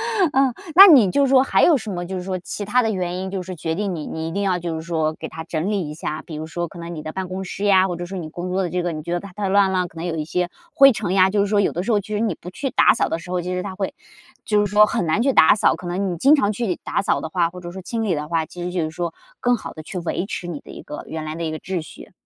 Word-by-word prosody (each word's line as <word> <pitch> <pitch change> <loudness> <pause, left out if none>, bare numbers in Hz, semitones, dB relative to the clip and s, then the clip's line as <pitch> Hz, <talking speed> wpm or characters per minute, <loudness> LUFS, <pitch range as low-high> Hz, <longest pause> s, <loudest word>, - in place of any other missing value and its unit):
懒 375 -6 +3
惰。 - - -16
呃， 265 -2 +3 0.2
那 395 +2 +12
你 250 - +7
就 280 +7 +3
是 - - 0
说 260 -1 +7
还 270 - +2
有 330 - +6
什 220 - -7
么 175 -2 -4
就 190 +1 -5
是 - - -4
说 185 0 -3
其 200 +3 -6
它 245 +4 +2
的 220 - +1
原 180 -2 -2
因 190 0 -4
就 190 -2 -3
是 185 0 -7
决 160 0 -3
定 195 0 -2
你 155 - -5
你 160 0 -4
一 - - -4
定 200 +3 -2
要 185 -2 +1
就 170 -1 -3
是 160 - -4
说 160 -2 -1
给 - - -5
它 160 0 -8
整 170 +4 -2
理 185 -7 -1
一 150 - -7
下？ 155 -1 -4
比 160 - -9
如 155 +1 -5
说 170 +2 -4
可 175 - -13
能 170 0 -7
你 155 - -6
的 155 - -6
办 190 -1 -4
公 190 +1 -5
室 195 +2 -5
呀， 190 -1 +5
或 175 - -3
者 175 +1 -5
说 190 +2 -7
你 160 -3 -6
工 175 +3 -5
作 190 +1 0
的 180 - -1
这 180 +1 -2
个 175 - -1
你 155 -1 -5
觉 170 +2 -4
得 175 - 0
它 200 -1 -10
太 205 0 -2
乱 195 -1 +4
了， 180 -1 0
可 165 - -22
能 165 - -4
有 165 -2 -2
一 150 - -2
些 180 +2 -1 0.3
灰 275 -3 +8
尘 200 -5 -2
呀， 190 0 +5
就 205 +1 0
是 200 - +2
说 205 0 +2
有 - - +1
的 175 - -3
时 235 - -1
候 210 - +3
其 200 - -10
实 210 - 0
你 225 -1 0
不 180 - -10
去 270 +7 -3
打 - - +5
扫 - - +1
的 165 - -1
时 180 - -10
候， 180 -1 0
其 180 +1 -4
实 180 0 -2
它 190 - -5
会 195 -1 -3 0.5
就 210 -1 +2
是 200 - -5
说 210 0 +7
很 215 -5 -1
难 160 +8 +1
去 270 +2 +3
打 160 - +6
扫， - - +3
可 180 - -9
能 185 +1 -1
你 170 - -4
经 285 - +6
常 210 -7 +1
去 210 -4 -2
打 - - -1
扫 - - 0
的 160 - -5
话， 170 -1 +1
或 180 +1 -11
者 175 0 -7
说 190 +1 -8
清 225 +4 -3
理 195 -5 +1
的 150 0 -3
话， 165 -1 0
其 175 +3 -10
实 180 - -2
就 180 -2 -1
是 155 - -3
说 170 0 -4 0.3
更 245 -1 +2
好 - - -8
地 155 - -9
去 180 +4 -7
维 175 +2 -2
持 180 - -5
你 160 -5 -5
的 - - -13
一 - - -10
个 150 - -7
原 160 -1 -5
来 155 +1 -5
的 170 - -4
一 160 - -2
个 155 - -4
秩 185 -3 -3
序。 155 - -12
180 Hz, 380 characters per minute, -22 LUFS, 170-205 Hz, 0.5 s, 那